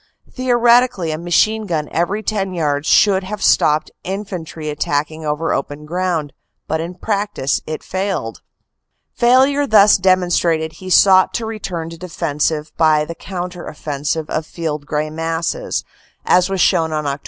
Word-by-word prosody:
Theoretically 240 -7 +3
a 155 - -3
machine 210 +6 +1
gun 155 -4 -2
every 190 +6 -1
ten 195 -4 -2
yards 145 -3 -1
should 195 -2 +4
have 205 +2 -5
stopped 150 0 +3
infantry 180 -5 -6
attacking 150 +1 -2
over 150 +2 -1
open 145 +2 -4
ground 170 -3 -2 0.3
but 160 +1 -1
in 170 +2 -6
practice 200 -8 -1
it 155 0 -5
failed. 190 - -3 0.7
Failure 265 +4 +3
thus 210 -3 +6
demonstrated 175 -4 +1
he 185 +4 -9
sought 185 0 +5
to 230 - -2
return 185 -7 -5
to 165 - -10
defense 155 -4 -1 0.3
by 155 -2 +3
the 170 - -6
counter 180 0 -6
offensive 150 +1 -3
of 155 0 -2
field 150 -3 -4
gray 150 +1 -2
masses, 165 - -2 0.4
as 180 +1 +3
was 195 -1 -2
shown 165 -3 +3
on 155 -1 -1
Oct. 140 0 -2
170 Hz, 145 wpm, -18 LUFS, 155-195 Hz, 0.7 s, thus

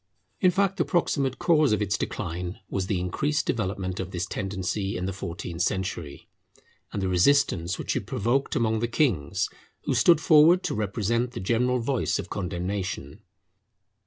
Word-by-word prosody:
In 185 - +5
fact, 195 +1 +1
the - - +3
proximate 140 -6 0
cause 155 -6 +3
of 105 - +2
its 100 -2 0
decline 90 +2 -4
was 95 -1 -2
the 95 -3 0
increased 145 - -1
development 95 -4 -2
of 95 -1 -3
this 90 -1 -3
tendency 95 0 -3
in 90 - -3
the 95 - -2
fourteenth 90 -2 -5
century, 90 -6 -3 0.6
and 100 - -3
the - - +1
resistance 90 -2 +2
which - - -2
it - - -3
provoked 120 +6 0
among 110 -1 +1
the 120 - 0
kings, 115 - +1 0.4
who - - 0
stood 170 -3 +5
forward 160 +3 +6
to - - -1
represent 110 +3 -1
the 120 - -5
general 125 +5 +1
voice 125 +1 0
of - - -6
condemnation. 95 -2 -4
100 Hz, 160 wpm, -26 LUFS, 95-130 Hz, 0.6 s, forward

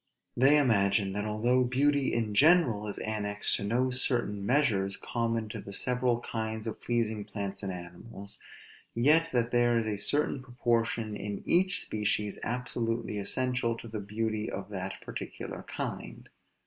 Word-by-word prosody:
They 135 +4 +6
imagine, 100 -7 +3
that 105 +1 -2
although 120 +4 +2
beauty 140 +3 +2
in 110 -3 -1
general 130 - +4
is 100 - -4
annexed 105 -1 -1
to - - -5
no 125 +5 +1
certain 120 -5 0
measures 100 -6 +2
common 115 -2 -2
to - - -5
the 100 - -8
several 125 +1 +1
kinds 110 -1 -4
of 110 - -5
pleasing 110 -3 0
plants 100 -1 -4
and 100 -2 -3
animals; 90 +3 -7 0.6
yet 155 +7 +4
that 120 -1 +1
there 120 -1 +3
is 115 -1 +1
a 105 -2 -1
certain 140 +5 +1
proportion 115 -3 0
in 105 -1 -5
each 185 +2 +3
species 105 -1 -1
absolutely 115 -2 -2
essential 125 +2 0
to 115 - -9
the 110 -1 -5
beauty 110 +1 -2
of 100 +1 -5
that 95 -1 -4
particular - - -6
kind. - - -6
115 Hz, 150 wpm, -30 LUFS, 105-125 Hz, 0.6 s, They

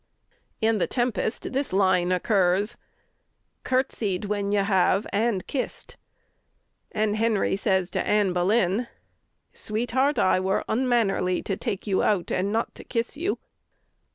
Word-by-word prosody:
In 220 -1 +2
the - - +1
"Tempest" 245 -1 -1
this 275 +1 -1
line 185 -2 +2
occurs: 190 +2 +2 0.9
Curtsied 225 -7 0
when 205 -1 -1
you 205 -1 +2
have 195 0 +2
and 205 -2 0
kissed. 270 - -3 1.0
And 215 0 0
Henry 220 -3 +1
says 190 -2 0
to - - -1
Anne 205 -3 +2
Boleyn: 195 +4 +1 0.7
Sweetheart, 245 +6 0
I 185 - +3
were 190 +1 0
unmannerly 220 -7 +1
to 195 - -2
take 205 -2 -4
you 195 -3 +1
out, 195 -5 +1
And 195 +2 0
not 225 +2 -1
to - - -10
kiss 235 +1 -2
you. 345 +7 -1
205 Hz, 130 wpm, -25 LUFS, 190-230 Hz, 1.0 s, I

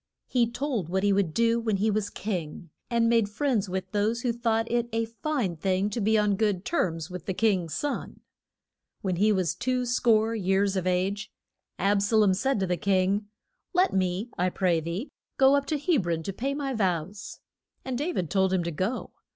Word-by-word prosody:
He 240 -3 +1
told 240 - -2
what 190 +2 0
he 205 -1 +4
would 195 -4 +1
do 230 +5 +2
when 220 -3 0
he 215 +3 +1
was 210 -1 -1
king, 170 -5 -5 0.2
and 235 -1 +2
made 230 -3 +3
friends 215 -3 0
with 190 0 -4
those 215 +3 0
who 240 -1 0
thought 225 -1 0
it 240 0 0
a 225 0 0
fine 230 - -2
thing 190 +4 0
to 230 - -2
be 220 +2 +3
on 210 -2 +2
good 205 -4 0
terms 165 - -1
with 180 -3 -7
the 190 - -1
king's 185 -8 +1
son. 290 -1 -4 0.8
When 185 -3 -1
he 210 +4 +4
was 185 -6 +1
two 255 0 -1
score 230 -2 +2
years 195 -1 +1
of 185 -1 -1
age, 185 +3 -1 0.5
Ab 200 0 +2
sa 205 +3 +1
lom 210 -3 +5
said 225 +5 0
to - - +2
the 180 -1 -1
king, 195 +1 +1 0.5
Let 365 +1 +3
me, 190 +5 -1
I 180 +1 +2
pray 180 -2 +1
thee, 170 - -4 0.3
go 270 +1 +6
up 280 0 0
to 310 - 0
Heb 290 - +1
ron 165 -1 -1
to 195 - -4
pay 270 +8 -2
my 280 -2 -2
vows. 190 -3 -2 0.5
And 260 -1 -2
Da 295 +8 -1
vid 180 - -3
told 190 -1 +2
him 185 -2 +1
to 170 - -3
go. 185 - -3
205 Hz, 205 wpm, -27 LUFS, 185-235 Hz, 0.8 s, go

